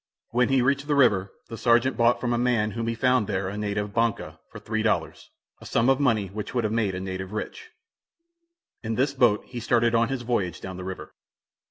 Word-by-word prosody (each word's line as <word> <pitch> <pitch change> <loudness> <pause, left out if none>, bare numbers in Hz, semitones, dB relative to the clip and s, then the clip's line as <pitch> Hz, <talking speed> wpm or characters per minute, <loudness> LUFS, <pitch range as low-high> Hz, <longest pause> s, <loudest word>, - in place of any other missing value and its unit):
When 125 +1 +2
he 135 -2 +3
reached 140 +2 +1
the 150 - +1
river 100 -8 +3 0.2
the 115 - -8
sergeant 120 +2 +3
bought 120 0 +3
from 120 -1 -1
a - - +1
man 120 -3 +1
whom 115 +1 -4
he 115 - -1
found 125 -2 +2
there 95 -2 -2
a 100 - -6
native 105 -1 -3
"banca," 115 -1 -1
for - - -9
three 110 0 -3
dollars, 110 -1 -1 0.3
a - - -13
sum 115 +3 +2
of 135 0 +3
money 115 -7 +2
which 105 +5 -7
would 120 -3 +1
make 110 -4 0
a - - -3
native 95 +1 -5
rich. 445 - -6 1.1
In 110 -1 -3
this 135 +3 +1
boat 120 -6 +2
he 125 - -7
started 120 0 +2
on 115 0 +2
his 135 -2 -3
voyage 100 -8 -1
down 95 -1 -7
the 95 - -7
river. 95 0 -7
115 Hz, 215 wpm, -25 LUFS, 105-125 Hz, 1.1 s, he